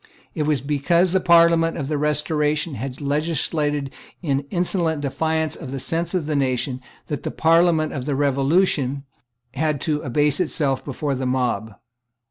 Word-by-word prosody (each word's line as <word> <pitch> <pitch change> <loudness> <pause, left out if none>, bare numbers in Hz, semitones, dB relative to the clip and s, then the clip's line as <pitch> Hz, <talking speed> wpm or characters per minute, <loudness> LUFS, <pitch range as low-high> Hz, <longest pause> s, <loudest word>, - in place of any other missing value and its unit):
It 150 -1 -2
was 150 -4 +1
because 160 +5 +2
the 190 - +3
Parliament 170 -2 +4
of 140 -4 -3
the 150 - -1
Restoration 150 +1 0
had 130 0 -6
legislated 150 -1 -1 0.3
in 140 -3 -1
insolent 175 -3 0
defiance 160 +3 -1
of 150 - -8
the 135 +1 -4
sense 165 +6 -1
of 175 -5 -1
the 150 0 -2
nation 130 -1 -1 0.2
that 145 -4 -4
the - - -3
Parliament 165 -1 +3
of 130 -3 -4
the 145 - 0
Revolution 140 0 +1 0.5
had 150 +1 -1
to 150 -2 -1
abase 145 +2 +1
itself 145 -6 0
before 140 +1 -3
the 130 -1 -2
mob. 125 -4 -1
150 Hz, 155 wpm, -22 LUFS, 135-165 Hz, 0.5 s, Parliament